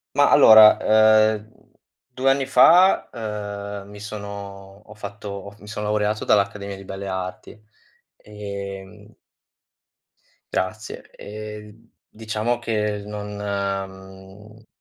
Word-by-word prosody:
Ma - - +4
allora, 110 -1 +8 0.6
ehm, 110 +1 -10 0.5
2 130 +1 0
anni 135 0 +1
fa, 180 +7 +5
eh, 105 -3 -6
mi 105 +1 -13
sono 100 -1 -9
ho 105 - -13
fatto 100 -1 -8
mi 105 - -14
sono 105 0 -5
laureato 105 0 -1
dall'Accademia 100 -1 0
di 95 - -12
Belle 95 +1 -7
Arti. 95 +2 -6 0.5
Ehm... 100 0 -9 1.4
Grazie. 105 +4 -4
E 105 0 -9 0.3
diciamo 110 +2 -3
che 105 -3 -2
non 105 0 -7
mhmm 100 +1 -6
105 Hz, 100 wpm, -22 LUFS, 100-105 Hz, 1.4 s, allora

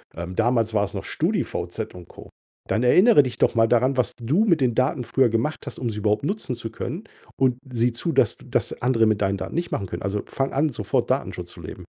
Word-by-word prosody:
ähm, 85 +2 -6
damals 115 0 +1
war's 105 -2 0
noch - - -5
StudiVZ - - -2
und 90 -1 -11
Co, - - -13 0.4
dann 110 - 0
erinnere 180 - +6
dich 125 -3 -5
doch - - +3
mal 115 0 +4
daran, 125 +3 +2
was 125 -5 +1
du 145 - +2
mit 170 -7 +3
den 125 -2 +2
Daten 130 +1 +1
früher 130 +1 +2
gemacht 115 +7 -1
hast, - - -6
um 120 - -2
sie 105 - -5
überhaupt 105 +2 +1
nutzen 150 -5 -2
zu 115 -1 -7
können 155 - -5 0.4
und 130 -2 +3
sieh 120 0 +1
zu, 145 +8 -2
dass 125 -7 +2
das - - -2
andere 120 -2 +3
mit 110 -2 +1
deinen 100 0 +1
Daten - - -6
nicht 170 +1 -1
machen 100 - -2
können. 85 - -6
Also, 100 +1 -2
fang 135 0 -2
an, 150 +3 +2
sofort 130 - -1
Datenschutz - - -2
zu - - -12
leben. - - -9
120 Hz, 230 wpm, -24 LUFS, 110-135 Hz, 0.4 s, erinnere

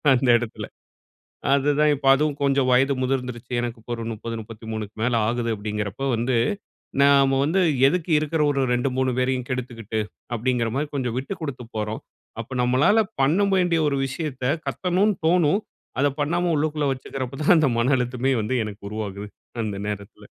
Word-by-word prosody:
அந்த 125 0 +1
இடத்தில 120 -2 -5 0.9
அதுதான் 145 +2 +3
இப்ப 140 -1 -5
அதுவும் 150 0 0
கொஞ்சம் 135 -2 +2
வயது 135 +3 +4
முதிர்ந்துருச்சு. 125 -2 -3
எனக்கு 120 -1 -4
இப்ப 120 - -15
ஒரு 115 -1 -5
30, 115 +1 -6
33க்கு 110 -1 -7
மேல 120 0 +1
ஆகுது 120 0 -1
அப்பிடிங்கிறப்போ 105 +3 -4
வந்து, 120 +2 0 0.7
நாம 140 -1 +5
வந்து 165 +6 +2 0.3
எதுக்கு 175 +3 -2
இருக்கிற 155 +1 -1
ஒரு 140 -1 +1
2, 125 +2 +1
3 130 0 +2
பேரையும் 130 -1 0
கெடுத்துக்கிட்டு 120 -4 -3 0.3
அப்படிங்கிறமாரி 125 +3 0
கொஞ்சம் 125 -4 -2
விட்டு 140 +9 -4
கொடுத்து 135 -6 -5
போறோம். 105 +1 -3 0.4
அப்ப 115 - -8
நம்மளால 130 - +4 0.2
பண்ண 190 +9 +3
வேண்டிய 175 -3 +2
ஒரு 140 -1 0
விஷயத்த 135 -1 -5 0.2
கத்தணுனு 190 +3 +1
தோணும், 175 +2 +3 0.4
அத 145 - +4
பண்ணாம 175 +4 +1
உள்ளுக்குள்ள 150 -1 0
வச்சுக்கிறப்ப 130 0 -5
தான் 175 - +6
அந்த 155 -3 +4
மன 125 +4 +2
அழுத்தமே 125 +1 0
வந்து 110 +5 -2
எனக்கு 105 0 -8
உருவாகுது. 105 -1 -5 0.4
அந்த 105 -2 -3
நேரத்தில. 100 -1 -7
130 Hz, 155 wpm, -24 LUFS, 115-145 Hz, 0.9 s, தான்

